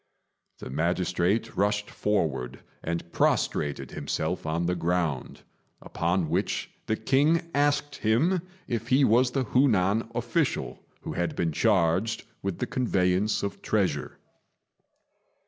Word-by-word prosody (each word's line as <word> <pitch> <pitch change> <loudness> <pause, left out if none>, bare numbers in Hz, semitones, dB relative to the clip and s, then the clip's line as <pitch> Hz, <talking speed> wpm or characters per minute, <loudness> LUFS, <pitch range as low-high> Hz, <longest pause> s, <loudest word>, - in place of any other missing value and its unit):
The - - -8
magistrate 90 - 0
rushed 105 +1 0
forward 80 -12 -1 0.2
and 85 +1 -4
prostrated 75 -1 0
himself 80 +1 -3
on 85 +2 0
the 90 - +1
ground; 85 -5 -1 0.4
upon 85 0 -1
which - - -1 0.2
the 110 - +1
king 150 - +2
asked 145 0 +1
him 155 - +2 0.3
if 115 -1 -3
he 130 +3 +4
was 125 +1 +4
the 130 +1 0
Hu 130 +4 +3
nan 105 +1 +1
official 120 +6 -1 0.2
who - - -5
had 85 -1 -2
been 85 -2 0
charged 85 +8 +2 0.2
with 95 -3 -3
the - - -1
conveyance 100 -4 +1
of 100 - -4
treasure. 90 -10 -1
100 Hz, 125 wpm, -27 LUFS, 85-120 Hz, 0.4 s, he